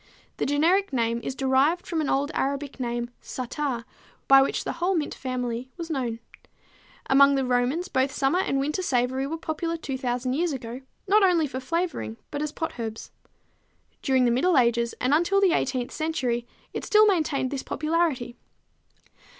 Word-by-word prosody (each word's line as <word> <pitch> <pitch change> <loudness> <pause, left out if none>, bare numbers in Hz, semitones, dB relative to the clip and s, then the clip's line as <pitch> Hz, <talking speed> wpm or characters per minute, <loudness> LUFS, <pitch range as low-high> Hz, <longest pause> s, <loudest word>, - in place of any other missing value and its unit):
The - - -1
generic 335 +8 +2
name 235 -2 0
is 260 - -4
derived 270 +6 +2
from 330 -3 -1
an 295 - -1
old 285 +2 +1
Arabic 280 0 -2
name, 240 -1 -3
Ssattar, 255 -1 -4 0.4
by 270 0 +8
which 270 - 0
the - - -2
whole 355 +3 0
mint 310 -3 -1
family 250 -1 -4
was 335 -1 -5
known. 245 -6 -2 0.9
Among 280 +1 +6
the 270 -1 +1
Romans 250 +8 +1
both 265 +1 +1
summer 275 +5 +1
and 275 -7 0
winter 300 +7 -1
savory 260 -3 0
were 325 +3 -3
popular 330 +1 -3
2,000 255 -4 -2
years 330 +2 0
ago, 245 -1 -6 0.3
not 420 +3 +5
only 355 -5 +4
for 260 -2 -4
flavoring, 265 - -2
but 290 - -3
as 300 -1 -2
potherbs. 230 -9 -5 0.9
During 260 -2 +3
the 240 - +3
middle 300 +7 +3
ages 235 -1 +2
and 255 +3 +1
until 345 +6 +3
the 395 -1 +4
18th 255 -6 0
century 255 -7 -2 0.3
it - - -4
still 430 0 +5
maintained 310 -9 +1
this 275 -2 -3
popularity. 305 -7 -1
270 Hz, 165 wpm, -26 LUFS, 250-325 Hz, 0.9 s, by